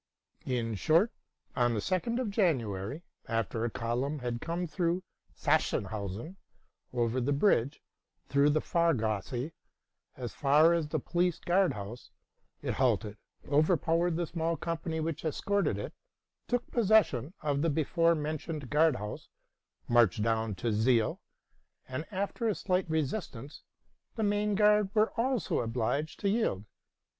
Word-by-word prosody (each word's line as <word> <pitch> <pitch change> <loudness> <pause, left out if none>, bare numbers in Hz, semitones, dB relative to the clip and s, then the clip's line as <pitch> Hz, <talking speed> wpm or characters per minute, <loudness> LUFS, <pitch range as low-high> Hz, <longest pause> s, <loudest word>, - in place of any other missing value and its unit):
In 120 -3 -1
short, 165 - +3 0.4
on 120 -1 +2
the - - 0
2d 185 - -1
of 240 -5 -2
Jan 180 - +3
uary, 105 - -5 0.2
after 115 0 -1
a 120 - 0
column 125 +5 -2
had 120 -3 -4
come 170 +2 -2
through 175 +2 -1 0.3
Sachsenhausen 105 - -1 0.5
over 120 +1 0
the 135 +4 0
bridge, 140 - +2 0.4
through 140 +1 +4
the 155 +1 +2
Fahrgasse, 125 - 0 0.7
as 125 -2 -5
far 150 +4 +5
as 165 -3 0
the 155 - -1
Police 175 +4 0
Guard 185 +2 +2
House, 105 +4 -8 0.5
it - - -1
halted, 115 -5 +1 0.3
overpowered 165 +3 +2
the 170 +1 0
small 165 0 -2
company 165 0 -3
which 160 0 -3
escorted 165 - 0
it, 100 - -5 0.5
took 245 0 0
possession 195 - +3
of 145 -2 0
the 165 - +2
before 165 +3 +2
mentioned 155 -2 -4
Guard 155 +1 +4
House, 105 +1 -6 0.6
marched 115 -4 +4
down 110 -2 0
the 115 +5 -1
Zeil, 110 +1 +2 0.7
and, 130 +5 -5
after 200 +3 -2
a 215 - +1
slight 185 -2 0
resistance, 150 - -3 0.5
the 220 - -1
main 205 0 +1
guard 210 -1 +4
were 215 0 +3
also 250 0 0
obliged 125 +7 -1
to 200 - +2
yield. 195 - 0
155 Hz, 135 wpm, -30 LUFS, 120-175 Hz, 0.7 s, far